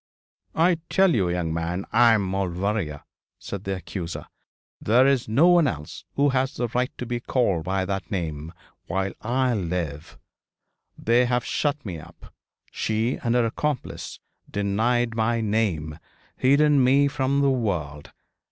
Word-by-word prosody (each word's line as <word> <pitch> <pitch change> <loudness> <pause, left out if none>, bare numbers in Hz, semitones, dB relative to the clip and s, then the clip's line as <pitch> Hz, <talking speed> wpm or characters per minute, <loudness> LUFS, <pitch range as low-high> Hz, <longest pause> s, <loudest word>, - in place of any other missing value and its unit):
'I 170 +1 +3
tell 190 -3 +4
you, 95 -8 +1
young 85 -2 -1
man, 85 +3 -2
I 115 0 +6
am 105 -2 +2
Maulevrier,' 95 -3 -2 0.3
said 100 -1 -7
the 95 0 -1
accuser; 90 -2 -6 0.6
'there 120 +5 +4
is 135 -3 +2
no 140 +10 +5
one 175 -4 +5
else 75 - -6
who 145 +1 +3
has 130 0 -1
a 120 - +1
right 125 +3 0
to 125 - -4
be 120 0 -2
called 100 -10 0
by 95 +1 0
that 95 0 -4
name, 80 -4 -4 0.4
while 95 0 -1
I 125 +2 +1
live. 85 -7 -4 0.8
They 120 +2 +3
have 120 -1 0
shut 145 -2 -1
me 90 -5 -5
up 80 - -15 0.4
she 110 +3 -1
and 120 -1 +1
her 120 -1 +3
accomplice 140 +4 -3 0.3
denied 115 +4 0
my 115 +1 +1
name 100 -9 -1 0.4
hidden 140 +1 +4
me 135 +3 +4
from 140 0 0
the 140 -1 +3
world. 85 - -2
110 Hz, 150 wpm, -24 LUFS, 90-130 Hz, 0.8 s, I